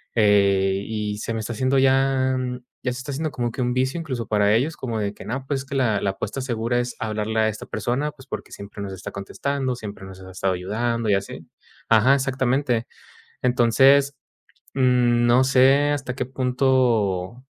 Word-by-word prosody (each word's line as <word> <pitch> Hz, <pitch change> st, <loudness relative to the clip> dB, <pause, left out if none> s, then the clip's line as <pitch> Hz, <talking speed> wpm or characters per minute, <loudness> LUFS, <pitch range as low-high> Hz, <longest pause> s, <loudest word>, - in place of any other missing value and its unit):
Eh, 100 Hz, -2 st, +3 dB
y 105 Hz, -1 st, -3 dB
se 115 Hz, -, -3 dB
me 115 Hz, -, -2 dB
está 115 Hz, +2 st, -4 dB
haciendo 130 Hz, +4 st, +1 dB
ya 130 Hz, 0 st, +2 dB, 0.5 s
ya 125 Hz, -, 0 dB
se -, -, -7 dB
está 130 Hz, +2 st, -6 dB
haciendo 150 Hz, +2 st, -3 dB
como 120 Hz, -1 st, -2 dB
que 130 Hz, -, -5 dB
un 125 Hz, 0 st, 0 dB
vicio, 130 Hz, +6 st, 0 dB
incluso, 130 Hz, -8 st, -4 dB
para 105 Hz, -1 st, +3 dB
ellos, 145 Hz, +8 st, 0 dB
como 115 Hz, -4 st, -3 dB
de 100 Hz, -1 st, -2 dB
que -, -, -12 dB
no, 130 Hz, +4 st, -4 dB
pues, 140 Hz, -2 st, -1 dB
es 140 Hz, -, -11 dB
que 140 Hz, -, -6 dB
la 110 Hz, -6 st, +2 dB
la 100 Hz, -, 0 dB
apuesta 110 Hz, +7 st, -5 dB
segura 120 Hz, -1 st, -1 dB
es 120 Hz, 0 st, -3 dB
hablarle 110 Hz, 0 st, -2 dB
a 110 Hz, -, +3 dB
esta 110 Hz, -, -7 dB
persona, 140 Hz, +5 st, -2 dB
pues, 135 Hz, -2 st, -17 dB
porque 110 Hz, -4 st, -7 dB
siempre 100 Hz, 0 st, -9 dB
nos 95 Hz, -1 st, -6 dB
está 95 Hz, -, -8 dB
contestando, 130 Hz, +6 st, -3 dB
siempre 105 Hz, -4 st, -8 dB
nos 95 Hz, 0 st, -11 dB
ha 95 Hz, -, -11 dB
estado 95 Hz, 0 st, -1 dB
ayudando 110 Hz, +5 st, -2 dB
y 100 Hz, -, +4 dB
así. 100 Hz, -, -5 dB, 0.4 s
Ajá, 115 Hz, +4 st, +5 dB
exactamente. 130 Hz, -2 st, 0 dB, 0.6 s
Entonces, 135 Hz, +3 st, +4 dB, 0.6 s
no 125 Hz, -1 st, +3 dB
sé 135 Hz, +2 st, +4 dB
hasta 135 Hz, -3 st, -3 dB
qué -, -, -2 dB
punto, 125 Hz, -5 st, 0 dB
120 Hz, 190 wpm, -23 LUFS, 105-130 Hz, 0.6 s, Ajá